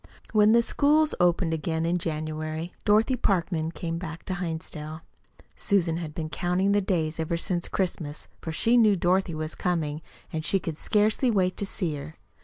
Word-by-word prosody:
When 210 0 +6
the 235 0 +5
schools 300 +5 +3
opened 175 -1 +2
again 160 0 -1
in 175 +1 +1
January, 155 +1 -4
Dorothy 220 +5 +4
Parkman 170 -7 0
came 165 +1 -4
back 165 -1 -7
to 185 - -3
Hinsdale. 160 -3 -5 0.5
Susan 175 -5 +1
had 160 -3 -6
been 160 -2 -3
counting 180 +6 0
the 205 0 +3
days 165 -4 -1
ever 160 +1 -1
since 175 0 -1
Christmas, 165 -6 -3
for 160 - -4
she 230 +9 +3
knew 215 -4 +5
Dorothy 180 -1 +1
was 155 0 -4
coming, 160 -4 -1 0.3
and 160 0 -2
she 195 - +2
could 165 -3 -4
scarcely 215 +4 +2
wait 185 -5 +2
to 200 - -2
see 170 -7 -1
her. 155 +3 -8
170 Hz, 175 wpm, -27 LUFS, 160-195 Hz, 0.5 s, When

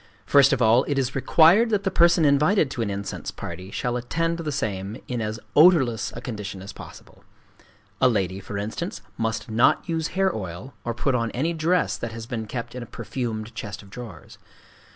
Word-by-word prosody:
First 140 -1 +6
of 125 - +2
all, 115 +4 +5
it 145 - -1
is 130 -1 0
required 170 - +5
that 205 -3 +1
the 195 - 0
person 170 -2 +4
invited 150 +2 +3
to 120 - -3
an 110 - -1
incense 100 0 -4
party 90 +1 -7
shall 120 +4 -2
attend 165 +7 -1
the 155 -2 -3
same 105 -5 -3
in 125 -2 -3
as 110 +1 -3 0.2
odorless 145 -8 +5
a 120 - -6
condition 105 -6 -6
as 100 - -8
possible: - - -13 0.8
a 125 - +6
lady, 95 -4 -1
for 100 +1 -6
instance, 105 +2 -4
must 115 -1 -2
not 115 +3 +3
use 165 -1 -1
hair 195 -1 +2
oil, 95 +6 -6
or 120 -1 -3
put 135 +3 0
on 115 -2 0
any 160 +6 0
dress 165 +2 +1
that 115 -1 -5
has 115 0 -7
been 115 -3 -4
kept 120 +2 -5
in 125 - -6
a 120 - -7
perfumed 115 -3 -5
chest 105 0 -7
of 100 - -17
drawers. 110 -9 -10
120 Hz, 195 wpm, -24 LUFS, 110-155 Hz, 0.8 s, First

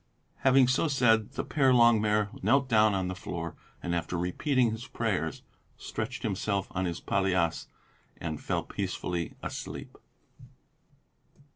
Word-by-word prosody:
Having 130 -1 +5
so 130 +5 +2
said, 115 -7 +3
the - - -3
Père 135 -4 +3
Longuemare 105 -3 +4
knelt 135 0 +3
down 110 -3 +4
on 95 -1 -1
the 90 - -3
floor, 85 -2 -5 0.3
and 85 - -2
after 85 +1 -2
repeating 120 - +1
his 115 +3 -6
prayers, 95 - -2 0.3
stretched 120 +5 -5
himself 100 -2 -1
on 95 0 -1
his 85 -1 -3
palliasse 90 -4 0 0.5
and 80 -2 -5
fell - - -1
peacefully 85 -2 -3
asleep. - - -6
105 Hz, 130 wpm, -29 LUFS, 90-125 Hz, 0.5 s, Having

